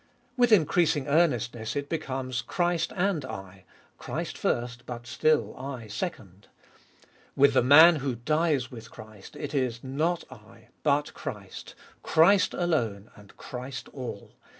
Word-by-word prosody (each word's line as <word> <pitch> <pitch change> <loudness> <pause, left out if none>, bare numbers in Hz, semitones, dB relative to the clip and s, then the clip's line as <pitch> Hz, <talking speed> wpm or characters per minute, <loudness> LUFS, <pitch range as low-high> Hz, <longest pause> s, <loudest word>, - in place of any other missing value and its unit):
With 245 -2 +3
increasing 160 -6 +3
earnestness 125 -8 +1
it 140 0 -2
becomes, 130 -5 -3
Christ 175 +5 -1
and 180 -5 0
I: 95 -6 -9 0.3
Christ - - -4
first, 120 0 -2
but 120 -1 -7
still 120 -3 +1
I 130 -3 -7
second. 105 - -6 0.9
With 140 +1 +5
the - - +4
man 155 +6 +8
who 135 -3 -2
dies 150 0 0
with 115 -3 -10
Christ 110 -2 -13
it - - -6
is, 125 -4 -1
Not 155 +6 -1
I, - - -16
but 145 0 +1
Christ: - - -8 0.3
Christ 185 +5 +4
alone 115 - -1
and 105 -2 -17
Christ 125 +1 -7
all. 125 -7 -7
135 Hz, 130 wpm, -27 LUFS, 120-160 Hz, 0.9 s, man